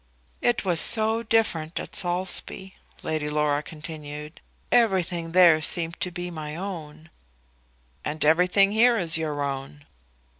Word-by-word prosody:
"It 240 -3 0
was 175 -3 0
so 220 0 +5
different 210 -8 -1
at - - -9
Saulsby," 190 +1 -2 0.3
Lady 155 -1 -3
Laura 150 -1 0
continued. 150 -1 -9 0.3
"Everything 180 -7 +1
there 170 -3 +5
seemed 165 +2 +1
to 180 - -1
be 175 0 -6
my 155 -2 -7
own." 160 -4 -8 0.9
"And 155 0 -2
everything 180 +5 +3
here 235 +2 +4
is 165 -4 +2
your 150 -2 -3
own." 140 +1 -6
165 Hz, 125 wpm, -24 LUFS, 150-190 Hz, 0.9 s, so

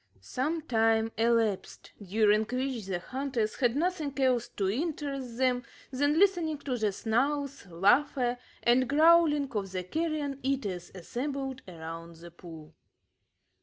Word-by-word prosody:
Some 305 +5 -2
time 225 -4 +2
elapsed, 225 -3 0
during 210 +2 +3
which 250 -3 -3
the 190 -2 -1
hunters 250 +2 -3
had 245 -2 +2
nothing 315 -3 -1
else 250 -3 +2
to 195 - -2
interest 275 - -3
them 255 -1 +2 0.3
than 285 +3 +1
listening 345 -5 +3
to 275 -3 -3
the 215 -3 0
snarls, 275 +5 -1
laughter, 245 - +2 0.2
and 245 +1 +3
growling 305 -1 +5
of 200 -5 -3
the 185 -1 -3
carrion 300 - -2
eaters 210 -10 -2
assembled 265 - -4
around 165 -1 -8
the 170 +1 -12
pool. 165 -2 -12
250 Hz, 130 wpm, -29 LUFS, 205-285 Hz, 0.3 s, growling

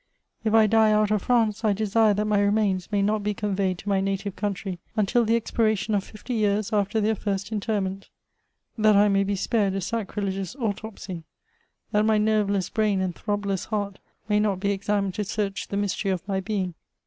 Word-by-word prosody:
If 220 0 +2
I 220 -1 +7
die 220 0 +4
out 215 0 +3
of 210 -2 +2
France, 225 -2 +1
I 215 -2 +3
desire 215 +1 +2
that 210 +1 0
my 210 -1 +2
remains 200 -2 +1
may 200 -1 +2
not 210 +1 +1
be 210 0 -1
conveyed 195 -3 -1
to 205 - -6
my 195 -1 +2
native 195 0 -2
country 195 -3 -3 0.2
until 220 +3 +2
the 225 +1 +3
expiration 220 -2 0
of 200 -2 +1
fifty 215 +5 -7
years 210 -2 0
after 205 +1 +1
their 215 +1 +2
first 200 0 -3
interment; 200 -2 -2 0.3
— - - -49
that 215 -1 +5
I 205 +1 +5
may 195 0 +3
be 200 +1 -1
spared 200 0 0
a - - 0
sacrilegious 195 -1 -3
autopsy; 205 - -5 0.7
that 210 0 +3
my 215 0 +3
nerveless 210 -3 +1
brain 210 -3 +1
and 185 -2 -1
throbless 200 -1 -2
heart 205 -3 -3 0.3
may 210 -1 +2
not 205 -3 +1
be 200 +1 0
examined 200 -1 -1
to 210 - -2
search 195 -1 -3
the 200 - -3
mystery 200 0 -1
of 185 0 -2
my 195 -1 0
being. 190 -2 -2
205 Hz, 195 wpm, -25 LUFS, 195-215 Hz, 0.7 s, I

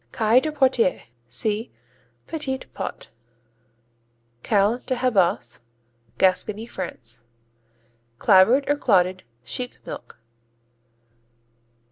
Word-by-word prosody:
Caille 225 +2 +4
de 310 - -2
Poitiers 260 -9 +2 0.2
see 210 - -1 0.5
Petits 270 -5 -4
pots. - - -6 1.3
Caille 210 - +2
de 255 - 0
Habas 180 - +1 0.6
Gascony, 205 - +1
France 125 - -6 0.9
Clabbered 215 - +5
or 290 - +2
clotted 185 -7 +2 0.2
sheep 245 - -3
milk. - - -9
215 Hz, 80 wpm, -23 LUFS, 185-255 Hz, 1.3 s, Clabbered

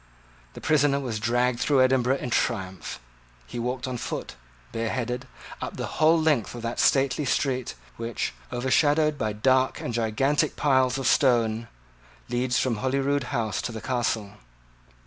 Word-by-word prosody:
The - - -10
prisoner 145 -2 +3
was 120 -6 -3
dragged 120 +2 +1
through 130 +1 +4
Edinburgh 130 0 +2
in 125 - -5
triumph. 95 -5 -2 0.5
He 120 - -6
walked 125 +2 -2
on 125 -1 -3
foot, - - -5 0.4
bareheaded, 120 +2 -2 0.3
up - - -5
the - - -2 0.2
whole 160 +2 +6
length 150 -8 +1
of 120 - -7
that 115 0 -3
stately 135 +2 +3
street 130 -2 -1 0.2
which, 115 - -3 0.2
overshadowed 145 +5 +2
by 110 -1 -1
dark 130 +4 +2
and 120 - -4
gigantic 120 +6 +1
piles 130 -3 +2
of 135 - -3
stone, 115 -5 +3 0.6
leads 125 +1 0
from 125 -4 +1
Holyrood 135 +2 0
House 115 -6 -2
to - - -4
the 110 - -6
Castle. 115 -5 -2
125 Hz, 145 wpm, -26 LUFS, 115-135 Hz, 0.6 s, whole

